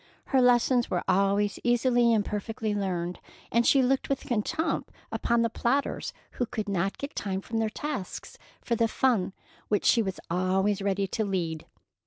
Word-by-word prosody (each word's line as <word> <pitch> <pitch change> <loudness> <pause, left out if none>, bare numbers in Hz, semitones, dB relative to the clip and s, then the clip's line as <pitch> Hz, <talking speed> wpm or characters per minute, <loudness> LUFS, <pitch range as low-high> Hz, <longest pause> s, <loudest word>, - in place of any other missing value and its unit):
Her 265 -2 +3
lessons 245 0 +4
were 175 - -1
always 200 +2 +2
easily 240 -1 +3
and 215 -3 +2
perfectly 215 +1 -3
learned, 180 -3 -2 0.3
and 235 +1 +3
she 270 -2 +5
looked 265 +1 +1
with 275 - 0
contempt 315 +9 -1 0.2
upon 235 0 +1
the - - +3
plodders 270 +5 0 0.2
who 245 - -2
could 220 -3 -4
not 195 0 -1
get 280 - -6
time 190 -2 -2
from 225 +3 -3
their 220 -1 +1
tasks 270 -4 -5 0.2
for 235 - -1
the 230 0 +2
fun 220 -6 +1 0.3
which 210 - 0
she 235 - +5
was 190 -3 -3
always 190 +3 +1
ready 200 0 0
to 220 - -1
lead. 170 -6 -2
215 Hz, 170 wpm, -28 LUFS, 195-240 Hz, 0.3 s, she